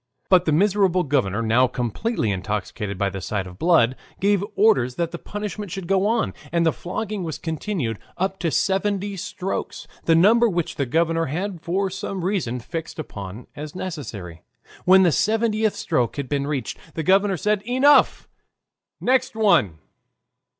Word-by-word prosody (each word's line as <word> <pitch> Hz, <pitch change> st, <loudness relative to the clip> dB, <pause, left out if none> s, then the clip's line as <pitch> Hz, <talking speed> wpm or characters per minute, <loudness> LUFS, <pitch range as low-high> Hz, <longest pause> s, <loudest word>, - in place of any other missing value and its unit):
But 185 Hz, -2 st, +5 dB
the 155 Hz, -, +2 dB
miserable 185 Hz, +1 st, +3 dB
governor, 115 Hz, -, 0 dB
now 120 Hz, +3 st, +4 dB
completely 125 Hz, -, -2 dB
intoxicated 100 Hz, +1 st, -3 dB
by 100 Hz, +1 st, 0 dB
the 95 Hz, 0 st, -6 dB
sight 100 Hz, -1 st, -2 dB
of 90 Hz, +1 st, -11 dB
blood, 155 Hz, -8 st, +4 dB, 0.2 s
gave 200 Hz, 0 st, +2 dB
orders 130 Hz, -, +3 dB
that 170 Hz, -1 st, -1 dB
the 170 Hz, -, -6 dB
punishment 205 Hz, -1 st, -5 dB
should 190 Hz, +1 st, -5 dB
go 195 Hz, +2 st, +2 dB
on, 230 Hz, +1 st, 0 dB, 0.2 s
and 170 Hz, -1 st, +2 dB
the 160 Hz, -, +3 dB
flogging 210 Hz, +2 st, -4 dB
was 160 Hz, -3 st, -4 dB
continued 160 Hz, -, -3 dB, 0.2 s
up 190 Hz, +1 st, -1 dB
to 170 Hz, -, 0 dB
seventy 200 Hz, +3 st, 0 dB
strokes, 190 Hz, +1 st, -4 dB, 0.2 s
the 165 Hz, -, +4 dB
number 225 Hz, +7 st, +5 dB
which 175 Hz, -4 st, -2 dB
the 140 Hz, -, -1 dB
governor 165 Hz, +4 st, +1 dB
had 175 Hz, +4 st, -3 dB
for 190 Hz, +3 st, -1 dB
some 195 Hz, -1 st, -4 dB
reason 175 Hz, -, -1 dB
fixed 165 Hz, +7 st, -6 dB
upon 100 Hz, -, -7 dB
as 150 Hz, +2 st, -7 dB
necessary. 110 Hz, -, -6 dB, 0.4 s
When 190 Hz, +1 st, +7 dB
the 175 Hz, -, +4 dB
seventieth 220 Hz, +3 st, +1 dB
stroke 120 Hz, -2 st, 0 dB
had 140 Hz, -2 st, -4 dB
been 140 Hz, 0 st, -1 dB
reached, 145 Hz, -3 st, -3 dB, 0.2 s
the 160 Hz, -, -2 dB
governor 195 Hz, +2 st, +3 dB
said 210 Hz, +4 st, +1 dB
"Enough! 260 Hz, +6 st, +4 dB, 0.7 s
Next 255 Hz, -1 st, +1 dB
one!" 195 Hz, -, +3 dB
170 Hz, 160 wpm, -23 LUFS, 130-200 Hz, 0.7 s, When